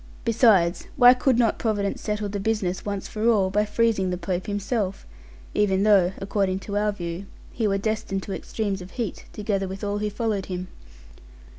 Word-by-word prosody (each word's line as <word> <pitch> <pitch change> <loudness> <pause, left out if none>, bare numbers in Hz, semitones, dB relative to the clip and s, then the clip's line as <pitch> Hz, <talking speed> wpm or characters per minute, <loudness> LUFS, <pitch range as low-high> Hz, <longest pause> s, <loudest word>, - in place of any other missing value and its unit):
Besides, 215 -7 +3
why 245 -1 +9
could 255 -1 +2
not 230 -3 +2
Providence 205 -3 -1
settle 210 -1 -2
the 200 0 -4
business 195 -3 -1
once 200 -2 -4
for 220 +2 0
all 195 -5 +3
by 210 +2 +2
freezing 210 -3 +1
the 180 - -2
Pope 180 +1 -3
himself; 205 -1 -2 0.5
even 195 -2 +2
though 195 -4 +4
(according 195 -1 0
to 200 - -5
our 210 0 +2
view) 175 0 -6 0.2
he 225 -3 0
were 195 -1 +1
destined 195 -2 -2
to 195 - -5
extremes 200 -1 -3
of 180 - -9
heat, 230 -6 -3
together 200 -2 -2
with 190 +2 -7
all 205 0 -1
who 210 0 -1
followed 210 -2 -2
him? 185 0 -5
205 Hz, 180 wpm, -25 LUFS, 190-215 Hz, 0.5 s, why